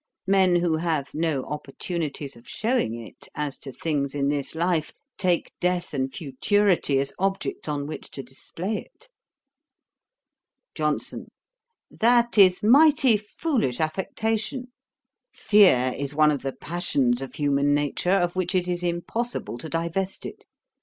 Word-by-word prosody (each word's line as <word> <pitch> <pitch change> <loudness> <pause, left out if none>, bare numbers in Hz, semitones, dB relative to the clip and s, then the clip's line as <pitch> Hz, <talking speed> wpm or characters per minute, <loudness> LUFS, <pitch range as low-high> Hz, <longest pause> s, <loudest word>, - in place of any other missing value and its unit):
Men 190 -2 +4
who 170 -2 +2
have 155 -4 -2
no 155 -4 0
opportunities 150 -1 -5
of 115 - -16
shewing 220 - 0
it 115 - -12
as 145 -2 -3
to 135 - -6
things 140 +1 -2
in 140 -1 +1
this 145 +1 -2
life, 170 -1 0 0.3
take 180 -3 0
death 180 -2 -1
and 135 -1 -1
futurity 165 +3 +1
as 140 +1 0
objects 195 -2 -2
on 145 -1 -2
which 155 - -7
to 135 - -7
display 165 - -4 0.2
it.' - - -18 1.6
JOHNSON. - - -2 0.6
'That 240 +1 +3
is 185 -1 +6
mighty 275 0 +6
foolish 210 - -1
affectation. 220 - -2 0.6
Fear 155 - +4
is 140 +1 -4
one 155 0 +5
of 145 - -2
the 135 0 -3
passions 140 -7 0
of 135 - -7
human 145 0 +2
nature, 145 +4 -1
of 175 -2 +2
which 185 +1 -1
it 180 -1 +1
is 175 0 -1
impossible 175 - -3
to 160 - -7
divest 170 +4 -2
it. - - -9
170 Hz, 140 wpm, -25 LUFS, 140-195 Hz, 1.6 s, is